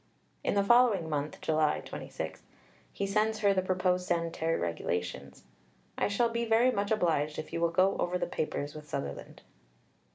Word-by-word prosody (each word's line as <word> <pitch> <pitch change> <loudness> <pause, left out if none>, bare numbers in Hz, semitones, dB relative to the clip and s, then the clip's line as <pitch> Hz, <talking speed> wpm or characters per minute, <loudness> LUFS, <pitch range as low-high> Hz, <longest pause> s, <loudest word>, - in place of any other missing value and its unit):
In - - 0
the 200 - +3
following 225 -6 +4
month 150 0 -2
(July 155 -1 +1
26), - - -6 0.5
he 200 - -3
sends 215 +2 +1
her 200 -1 +4
the 190 - +2
proposed 185 -1 0
Sanitary 165 -1 0
Regulations: 90 +1 -3 0.5
"I - - +1
shall 230 +4 +1
be 235 0 -1
very 230 +2 +4
much 200 -3 -1
obliged 160 -8 +1
if 155 - -6
you 165 - -2
will 170 - +3
go 185 +3 +3
over 180 +1 0
the - - -1
papers 145 -3 -3
with 150 -1 -10
Sutherland." 140 - -6
180 Hz, 165 wpm, -30 LUFS, 155-205 Hz, 0.5 s, following